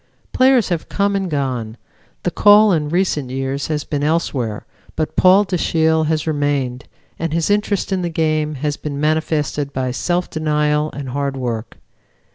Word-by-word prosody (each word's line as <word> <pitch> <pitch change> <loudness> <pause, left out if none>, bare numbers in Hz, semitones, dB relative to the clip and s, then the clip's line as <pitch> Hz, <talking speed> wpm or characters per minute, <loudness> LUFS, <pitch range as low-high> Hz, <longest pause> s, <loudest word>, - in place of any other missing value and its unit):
Players 255 -5 +4
have 170 -3 -3
come 200 0 0
and 195 -2 -1
gone; 125 -6 -3 0.5
the - - 0
call 210 0 +6
in 155 -4 0
recent 165 -6 0
years 135 +1 -3
has 150 -2 -2
been 145 -1 -3
elsewhere, 135 -9 -1 0.3
but 155 - -2
Paul 190 +2 +6
Dashiell 160 -3 +1
has 155 -1 0
remained, 145 -4 -1 0.3
and 165 -1 -2
his 165 +4 +1
interest 205 -1 0
in 190 -1 0
the 175 - -2
game 155 -2 0
has 145 +2 -2
been 145 -2 -5
manifested 150 -2 0
by 130 -2 -2
self 175 +7 -1
denial 150 -1 0
and 140 -2 -6
hard 140 +1 -2
work. 120 -3 -4
155 Hz, 160 wpm, -19 LUFS, 140-170 Hz, 0.5 s, call